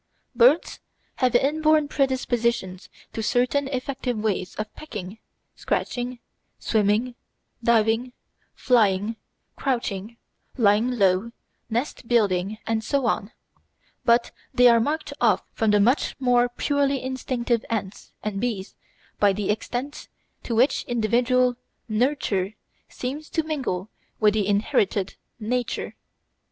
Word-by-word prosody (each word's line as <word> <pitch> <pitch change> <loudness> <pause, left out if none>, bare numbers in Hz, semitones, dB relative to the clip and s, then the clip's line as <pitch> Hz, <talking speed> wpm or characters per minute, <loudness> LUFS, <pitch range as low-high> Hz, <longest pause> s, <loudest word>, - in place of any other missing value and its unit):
Birds 255 +7 +4 0.4
have 255 -2 +2
inborn 305 +3 +3
predispositions 235 -9 -1 0.2
to 225 - -3
certain 250 +5 +1
effective 260 -2 -3
ways 205 -4 -2
of 215 0 -5
pecking, 215 -8 -8 0.4
scratching, 245 0 -2 0.4
swimming, 220 +3 +1 0.5
diving, 230 +1 +2 0.4
flying, 215 -3 +2 0.4
crouching, 230 -4 -2 0.4
lying 215 +1 +4
low, 195 +2 +2 0.4
nest 240 +1 -3
building, 205 -3 +1
and 225 -1 -1
so 275 +2 0
on; 215 -1 0 0.7
but 235 0 +3 0.2
they 250 0 +6
are 235 -1 +6
marked 295 +7 -2
off - - +3
from 220 -2 +1
the 210 0 +4
much 240 +8 +2
more 245 -2 +3
purely 280 +2 0
instinctive 250 -3 -1
ants 210 -4 -4
and 205 -2 -3
bees 215 -6 -3 0.5
by 205 -1 +5
the 200 +1 -1
extent 245 +6 -4 0.3
to 235 - -3
which 250 +5 +3
individual 245 +2 +2 0.3
"nurture" 215 -4 0 0.3
seems 285 +5 -5
to 320 - 0
mingle 265 - -3 0.3
with 210 -1 +4
the 210 -2 0
inherited 205 -2 +1 0.3
"nature." 240 +2 -2
235 Hz, 115 wpm, -24 LUFS, 210-255 Hz, 0.7 s, they